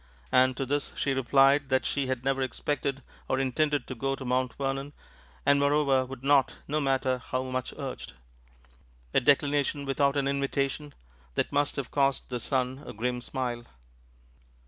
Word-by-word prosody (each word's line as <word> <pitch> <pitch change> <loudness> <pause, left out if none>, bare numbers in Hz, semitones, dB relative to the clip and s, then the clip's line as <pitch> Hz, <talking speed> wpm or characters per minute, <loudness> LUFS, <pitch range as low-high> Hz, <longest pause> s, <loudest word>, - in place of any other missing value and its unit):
And 130 0 +4
to 135 - -1
this 145 +2 -1
she 140 - +1
replied 135 +2 +4
that 130 0 +2
she 140 -2 -1
had 130 -1 -3
never 135 0 +1
expected 135 +1 -2 0.3
or 130 - +2
intended 145 +3 +1
to - - -6
go 135 +3 -1
to 135 - -8
Mount 125 0 0
Vernon, 135 +1 -3 0.5
and 140 0 +5
moreover 140 -2 +3
would 135 -1 -9
not, 140 -1 +4
no 150 +1 0
matter 130 -2 +1
how 130 +1 -3
much 130 -1 -3
urged - - -6 1.0
a - - +5
declination 145 +1 +2
without 140 +1 +1
an 140 -1 +1
invitation 140 +1 -1 0.4
that - - 0
must 145 0 +1
have 140 -3 -4
caused 140 -1 +1
the 125 - -1
son 130 +2 -1
a - - -6
grim 125 +3 -2
smile. 120 -2 -3
135 Hz, 165 wpm, -28 LUFS, 130-140 Hz, 1.0 s, and